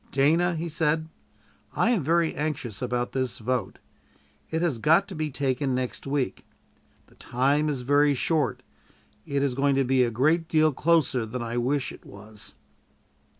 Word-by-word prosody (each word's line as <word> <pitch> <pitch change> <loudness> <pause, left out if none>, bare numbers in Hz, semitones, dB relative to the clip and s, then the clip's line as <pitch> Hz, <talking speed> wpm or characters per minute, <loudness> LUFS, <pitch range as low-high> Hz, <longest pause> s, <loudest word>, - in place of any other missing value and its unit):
"Dana," 165 +6 +2
he 165 +2 -3
said, 160 0 0 0.6
"I 235 - +2
am 210 -10 +1
very 165 +2 +2
anxious 145 -8 -4
about 125 -1 -2
this 130 -3 -2
vote. 120 -2 -2 0.7
It 160 +1 -1
has 150 -9 0
got 165 - +4
to 190 - -6
be 155 -1 -2
taken 135 -1 -1
next 130 +1 -4
week. 135 -2 -2 0.6
The - - -24
time 140 +5 0
is 140 -4 -2
very 145 +2 +3
short. 145 -2 0 0.6
It 140 -1 0
is 140 -3 0
going 140 +1 +1
to 135 - +2
be 130 0 +3
a 120 - +1
great 155 +8 +1
deal 155 -2 +3
closer 150 -5 +2
than 120 +2 -5
I 115 +1 -4
wish 130 +3 0
it - - -13
was." 105 +1 -12
140 Hz, 165 wpm, -26 LUFS, 125-155 Hz, 0.7 s, got